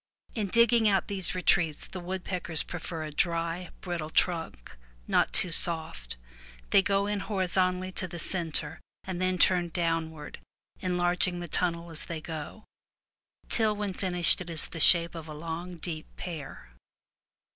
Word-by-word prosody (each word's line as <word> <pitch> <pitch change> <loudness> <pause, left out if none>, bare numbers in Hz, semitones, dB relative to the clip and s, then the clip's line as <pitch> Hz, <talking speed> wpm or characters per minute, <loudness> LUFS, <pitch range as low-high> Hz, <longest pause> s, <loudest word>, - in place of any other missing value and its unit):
In 215 -3 -2
digging 230 +1 +4
out 195 0 +1
these 190 -3 +4
retreats 175 -4 +2
the 185 - -7
woodpeckers 180 -2 -2
prefer 165 -2 -6
a 155 - -6
dry, 170 +2 -1
brittle 170 -4 -4
trunk, 160 - -1 0.3
not - - +2
too 180 - +4
soft. 160 - 0 0.5
They - - +6
go 195 0 +1
in 205 0 -2
horizontally 185 -2 -1
to 185 - -3
the 175 - -8
centre 160 -3 -2 0.2
and 185 -1 -5
then 185 0 +1
turn 175 -1 +3
downward, 165 -3 -3 0.4
enlarging 180 0 +1
the 175 - -6
tunnel 170 0 -2
as 160 - +1
they 165 -2 -5
go, 160 +6 -8 0.8
till 220 -2 +4
when 205 -2 -3
finished 180 -2 +2
it 175 - -7
is 165 -2 -1
the 165 - -5
shape 170 +1 +7
of 165 -2 -8
a 155 - -8
long, 165 +3 -6
deep 160 -2 -5
pear. 155 - -8
175 Hz, 150 wpm, -28 LUFS, 165-185 Hz, 0.8 s, shape